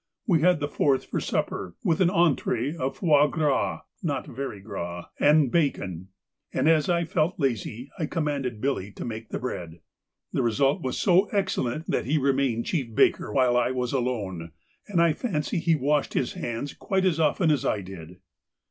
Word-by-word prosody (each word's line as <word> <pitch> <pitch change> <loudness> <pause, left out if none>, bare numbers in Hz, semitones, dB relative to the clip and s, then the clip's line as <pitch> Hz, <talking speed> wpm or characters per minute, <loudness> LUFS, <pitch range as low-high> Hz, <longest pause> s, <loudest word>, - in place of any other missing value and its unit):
We 170 -8 +3
had 180 -1 +4
the 145 - -1
fourth 140 -2 +1
for - - -2
supper, 90 -3 -2
with 165 +1 +1
an 180 - +5
entrée 160 - +1
of 135 -3 -3
foie 150 -3 +4
gras 150 -3 0 0.2
(not 145 -6 -2
very 130 -4 -6
gras) 90 -4 -6
and 150 -3 +4
bacon, 95 - -1 0.4
and 130 +3 +1
as 160 -1 +4
I 170 -1 +2
felt 165 +2 0
lazy 125 -1 -2
I 155 - -1
commanded 140 -8 -2
Billy 130 -8 -1
to - - -6
make 110 -1 -6
the - - -3
bread. 85 -9 -5 0.5
The - - +1
result 135 - +2
was 130 -4 -2
so 185 +1 +4
excellent 170 - -1
that - - 0
he 155 +3 +2
remained 135 -4 +1
chief 130 -10 -2
baker - - +3
while 125 0 +3
I 125 0 +3
was 125 -1 -2
alone, 100 - -2 0.3
and 195 -5 0
I 170 -2 +4
fancy 175 - -2
he 165 0 +2
washed 145 +1 0
his 125 - 0
hands 120 +4 -4
quite 190 -1 -1
as 170 -4 +2
often 160 +2 +3
as 145 -4 +1
I 105 - 0
did. 90 -2 -10
140 Hz, 180 wpm, -26 LUFS, 115-160 Hz, 0.5 s, an